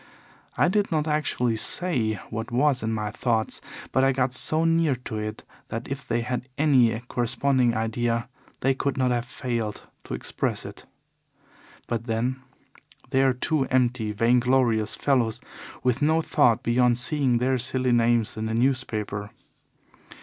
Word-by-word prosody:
I - - +4
did 200 +2 +1
not 155 -1 0
actually 130 -6 0
say 125 -6 +1 0.2
what 115 +1 -4
was 130 +2 +2
in 110 - -2
my 105 -1 -2
thoughts, 110 0 -1 0.3
but 130 - +2
I 135 - +4
got 130 -1 0
so 155 +5 +1
near 165 -4 +3
to 120 -3 -6
it 105 0 -5 0.2
that 115 +2 -5
if 135 0 -6
they 120 0 0
had 125 +2 -4
any 130 -7 +3
corresponding 125 0 +1
idea 115 +1 -1 0.3
they 135 - +3
could 135 +1 -2
not 130 -1 +2
have 120 -1 0
failed 120 -4 -4 0.2
to - - -4
express - - -3
it. - - -10 1.0
But 115 -1 -3
then 120 +3 -1 0.7
they 135 - +3
are 135 -1 +4
two 135 +3 0
empty, 125 -4 +1
vainglorious 120 0 +2
fellows 120 -5 +1 0.4
with 125 +1 +1
no 155 +2 +3
thought 120 -5 +3
beyond 120 0 +3
seeing 130 -1 +2
their 130 +2 +1
silly 130 +1 0
names 120 -1 +2
in 110 0 -2
the 110 - -2
newspaper. 115 -5 -1
125 Hz, 150 wpm, -25 LUFS, 115-135 Hz, 1.0 s, I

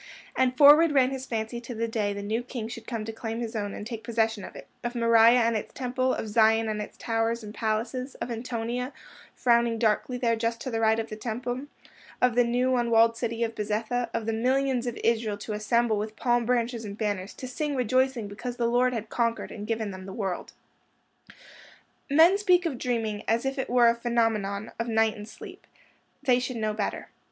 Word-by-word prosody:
And 255 -1 +1
forward 295 +2 +8
ran 265 -2 +4
his 265 -1 -5
fancy 225 +1 -3
to 240 0 -7
the 230 +1 -1
day 215 -3 -1
the 200 0 -5
new 220 +3 -1
King 245 -2 -6
should 230 0 -9
come 230 -3 -3
to 225 - -4
claim 225 0 -5
his 230 -1 -4
own 205 -2 -3
and 210 - -7
take 230 -1 -6
possession 225 -3 0
of - - -9
it—of 240 +1 -8
Moriah 230 +1 +5
and 230 0 +2
its 215 - -3
Temple; 255 0 0
of - - -4
Zion 225 +1 +3
and 215 -1 -2
its 210 - -8
towers 225 0 -1
and 210 0 -8
palaces; 230 +4 -2
of 245 - -5
Antonia, 240 +2 -3 0.4
frowning 235 -1 +2
darkly 225 +3 +1
there 235 -2 +1
just 230 +1 -2
to 260 - -4
the 225 - -1
right 220 0 +3
of 225 0 -3
the 215 - -5
Temple; 245 +4 -4 0.5
of 250 -1 +3
the 245 +1 +4
new 250 +2 +1
unwalled 230 -1 +4
city 230 0 -2
of 225 -1 -2
Bezetha; 225 +3 -2
of 230 -1 -3
the 225 - -1
millions 255 +2 +1
of 240 - -3
Israel 225 -3 +1
to 210 +1 -6
assemble 220 +1 +1
with 215 +1 -4
palm 240 0 +1
branches 240 -1 0
and 205 -1 -7
banners, 205 -3 -2
to 255 - -7
sing 290 +3 -3
rejoicing 255 -1 +1
because 240 +4 -6
the 235 - 0
Lord 245 +2 +2
had 220 -2 -4
conquered 230 -1 -1
and 210 0 -7
given 220 -2 -2
them 185 0 -9
the 190 - -7
world. 195 -5 -4 1.6
Men 330 +7 +6
speak 365 -3 +3
of 275 -7 -2
dreaming 225 -4 -1
as 230 +3 +1
if 270 0 -2
it - - -2
were 245 -1 +5
a 230 - +5
phenomenon 225 -4 -1
of 230 - -1
night 225 -1 +2
and 210 0 -9
sleep. - - -12 0.6
They 250 -3 +4
should 250 -1 -4
know 215 -1 -1
better. 210 -1 -3
230 Hz, 210 wpm, -27 LUFS, 220-250 Hz, 1.6 s, forward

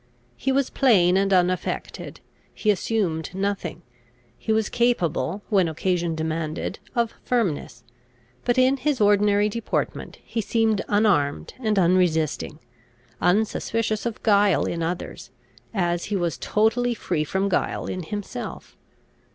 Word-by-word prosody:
He 270 - -1
was 270 0 +1
plain 185 -9 +4
and 195 +1 +2
unaffected; 180 -1 -1 0.3
he 215 - +2
assumed 185 -6 -1
nothing; 190 -4 -3 0.5
he 220 - -3
was 220 -1 +2
capable, 200 - 0
when 195 -5 +3
occasion 170 +1 -1
demanded, 160 0 -3 0.2
of 235 -1 +1
firmness, 180 - -1 0.6
but, 245 - +1
in 260 +2 +4
his 275 +1 0
ordinary 205 0 +4
deportment, 225 +2 -3
he 230 - -3
seemed 220 -1 +1
unarmed 175 - +1
and 215 -4 0
unresisting, 170 -5 +2 0.6
unsuspicious 220 +3 +1
of 230 - -6
guile 205 -3 +4
in 170 - -2
others, 170 +2 -4 0.4
as 175 -4 0
he 205 - -2
was 170 -7 -1
totally 235 +3 +1
free 170 -7 -1
from 190 +6 -1
guile 185 - -1
in 185 - -4
himself. 205 +4 -6
200 Hz, 125 wpm, -24 LUFS, 175-220 Hz, 0.6 s, plain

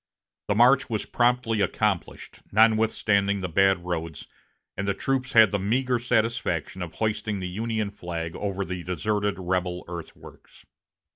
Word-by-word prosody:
The 100 - +1
march 125 +4 +5
was 110 -2 -2
promptly 120 -3 +1
accomplished, 100 -1 -2
notwithstanding 105 -2 +3
the 90 - -2
bad 95 +1 +2
roads, 85 -3 -4 0.5
and 100 +1 -3
the 100 - 0
troops 135 +3 -1
had 110 -2 +7
the 100 - 0
meager 125 +5 0
satisfaction 115 -4 -1
of 85 -2 -6
hoisting 105 -1 -2
the 90 - -4
Union 110 +2 -2
flag 85 -4 -5
over 100 -1 -3
the 90 -1 -5
deserted 100 +3 -1
rebel 90 -1 -2
earthworks. 85 -1 -11
100 Hz, 140 wpm, -25 LUFS, 90-110 Hz, 0.5 s, had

